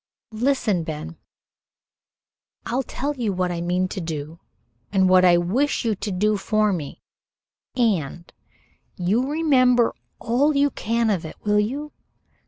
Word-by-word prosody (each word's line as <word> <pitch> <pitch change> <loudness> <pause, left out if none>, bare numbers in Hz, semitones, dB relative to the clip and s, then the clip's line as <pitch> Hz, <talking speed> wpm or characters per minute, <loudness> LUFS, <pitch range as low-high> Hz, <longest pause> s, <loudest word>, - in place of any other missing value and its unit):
Listen, 220 -6 0
Ben. 150 - -6 1.5
I'll 250 +3 -1
tell 285 +3 -4
you 235 -6 -1
what 180 -1 -1
I 170 -1 -3
mean 180 +2 0
to 190 - -5
do 160 0 -6 0.5
and 190 -2 +3
what 185 0 +5
I 175 -1 +6
wish 235 +11 0
you 225 - +2
to 205 +2 -5
do 210 +3 +1
for 215 +1 +1
me 155 -6 -6 0.7
and 175 - -1 0.6
you 215 +9 0
remember 255 -6 +3 0.2
all 275 +6 +1
you 280 0 +3
can 230 0 0
of 185 -5 -1
it, 160 - -8
will 210 0 +2
you? 280 +8 -2
210 Hz, 140 wpm, -23 LUFS, 180-250 Hz, 1.5 s, I